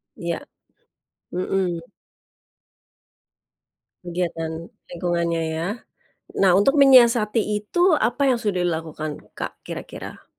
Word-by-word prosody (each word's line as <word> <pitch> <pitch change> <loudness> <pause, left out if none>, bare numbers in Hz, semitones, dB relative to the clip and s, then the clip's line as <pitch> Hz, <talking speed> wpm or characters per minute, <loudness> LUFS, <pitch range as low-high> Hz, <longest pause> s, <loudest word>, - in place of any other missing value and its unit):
Iya. - - -3 0.9
Mhm. 180 -1 -1 2.2
Kegiatan 170 -2 -3 0.2
lingkungannya 170 -1 -1
ya. 165 +2 -2 0.7
Nah, 190 -2 +5
untuk 275 +9 +4
menyiasati 235 -5 +6 0.2
itu 350 - +2
apa 240 +6 +1
yang 240 - 0
sudah 200 -6 -1
dilakukan, 160 -3 -3 0.2
Kak, - - -6
kira-kira? - - -8
180 Hz, 85 wpm, -23 LUFS, 170-230 Hz, 2.2 s, menyiasati